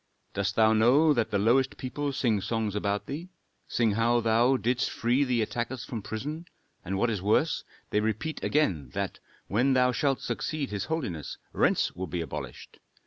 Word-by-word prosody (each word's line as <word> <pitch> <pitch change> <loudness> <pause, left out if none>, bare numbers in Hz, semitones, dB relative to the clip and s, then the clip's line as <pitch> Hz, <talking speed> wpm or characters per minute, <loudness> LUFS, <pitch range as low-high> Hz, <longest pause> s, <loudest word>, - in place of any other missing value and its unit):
Dost 100 0 -1
thou 110 0 +5
know 130 +8 +5
that 120 -5 0
the 100 - +1
lowest 120 +6 +2
people 140 +3 -3
sing 115 -6 +1
songs 110 -1 -1
about 100 0 -1
thee, 160 +6 -6 0.4
sing 115 -3 +2
how 115 +3 +2
thou 115 +3 +3
didst 120 0 0
free 120 +4 +1
the 125 -4 +1
attackers 120 +2 -4
from 115 -3 -5
prison, 140 - -5 0.4
and 95 +2 -2
what 120 +4 +2
is 105 -4 -2
worse, 105 +3 +2 0.3
they 105 - +3
repeat 110 +9 -2
again, 90 - +1
that, - - -3 0.3
when 125 +7 +2
thou 125 -1 +4
shalt 135 +1 +1
succeed 150 -6 -3
his 105 -1 -2
holiness, 105 - -3 0.2
rents - - +2
will 95 +1 -4
be 90 - -3
abolished. 80 - -7
115 Hz, 175 wpm, -28 LUFS, 105-135 Hz, 0.4 s, thou